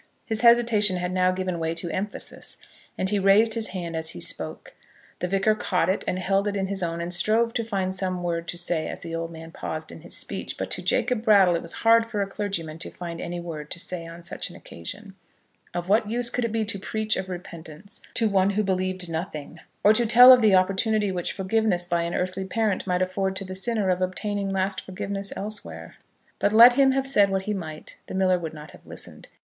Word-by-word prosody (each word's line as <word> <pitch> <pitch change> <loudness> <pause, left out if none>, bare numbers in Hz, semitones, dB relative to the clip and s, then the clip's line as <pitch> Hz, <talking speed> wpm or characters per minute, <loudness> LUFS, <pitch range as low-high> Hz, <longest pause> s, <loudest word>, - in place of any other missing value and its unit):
His 220 -1 -1
hesitation 230 -5 +4
had 180 0 -2
now 185 0 +2
given 185 -2 -3
way 165 0 -2
to 170 0 -3
emphasis, 200 +5 -6 0.4
and 190 - 0
he 205 - +2
raised 205 +3 +5
his 225 -1 0
hand 175 -3 -5
as 160 0 -1
he - - -5
spoke. - - -3 0.5
The 180 - -1
Vicar 195 +3 +2
caught 185 -4 0
it 190 - 0
and 180 - 0
held 195 +2 +1
it 205 - -1
in 195 -1 0
his 195 0 -1
own, 170 -1 -2
and 175 +1 -2
strove 225 +5 +2
to 230 - -1
find 195 -4 -2
some 185 -1 -2
word 170 -1 -2
to 175 - -5
say 170 -2 -1
as - - -6
the 165 - -7
old 165 0 -3
man 165 0 -10
paused 155 -1 -6
in - - -11
his 175 - -5
speech. - - -5
But - - -4
to - - 0
Jacob 250 - 0
Brattle 200 -6 +5
it 170 - -1
was - - -7
hard 230 0 +6
for 210 -3 -1
a - - -2
clergyman 195 -6 -4
to - - -7
find 170 -2 -7
any 175 +1 -4
word 155 -3 -7
to - - -6
say 170 -1 -5
on 170 +1 -11
such - - -4
an - - -13
occasion. 195 - -9 0.6
Of 175 0 -4
what 210 +2 +2
use 235 +1 0
could 245 0 -1
it 230 - -2
be 225 -1 0
to 205 -2 -4
preach 215 +2 -2
of 190 0 -4
repentance 175 +1 -9
to 225 - +2
one 195 -2 +3
who 205 +1 0
believed 185 -1 -2
nothing; 160 -1 -5 0.2
or 210 - +7
to 235 +1 +2
tell 245 +3 +10
of 250 - +5
the 210 -3 +5
opportunity 195 +2 +2
which 180 -2 -3
forgiveness 190 -2 +1
by 170 -1 0
an 170 +1 -3
earthly 185 +1 -2
parent 210 0 -1
might 180 0 +1
afford 190 +1 -2
to 195 +1 -3
the 185 - -7
sinner 200 0 +1
of 180 0 -1
obtaining 200 +2 -2
lasting 190 0 -1
forgiveness 195 +1 -3
elsewhere? 210 +1 -6 0.5
But 205 - +1
let 235 +3 +9
him 270 0 +4
have 270 0 0
said 210 -7 +4
what 190 0 -1
he 210 - -2
might, 160 -6 -7
the - - -6
miller 185 -1 +2
would 160 -2 -6
not 150 0 -10
have - - -17
listened. - - -10
190 Hz, 230 wpm, -25 LUFS, 175-215 Hz, 0.6 s, tell